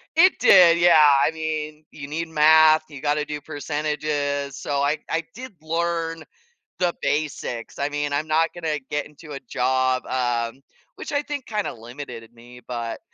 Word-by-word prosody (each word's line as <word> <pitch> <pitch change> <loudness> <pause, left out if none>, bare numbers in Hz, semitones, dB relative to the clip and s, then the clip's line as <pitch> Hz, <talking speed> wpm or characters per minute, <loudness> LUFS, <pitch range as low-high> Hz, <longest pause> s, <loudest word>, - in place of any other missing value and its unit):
it 365 -2 +5
did, 180 -7 +7
yeah, 160 -4 +6
I - - +2
mean, 155 -1 -4
you 140 -2 -9
need 165 +3 -4
math, 155 0 +6
you 140 -2 -10
gotta 150 0 0
do 150 0 -5
percentages, 145 -1 -3
so 140 -1 -2
I 145 +2 +1
I 165 0 -1
did 255 -3 -9
learn 165 0 -2 0.6
the 175 -1 +1
basics, 145 -6 -3
I 140 +1 0
mean, 145 0 -3
I'm 150 +2 -1
not 160 +1 +2
gonna 160 -3 -2
get 150 -1 -2
into 150 0 -13
a 140 - -6
job, 130 0 0
um, 120 0 -2 0.4
which - - -7
I 285 0 +1
think 290 -3 -6
kinda 210 -2 -2
limited 120 -1 -10
me, 120 +1 -15
but 115 -2 -4
150 Hz, 165 wpm, -23 LUFS, 140-165 Hz, 0.6 s, did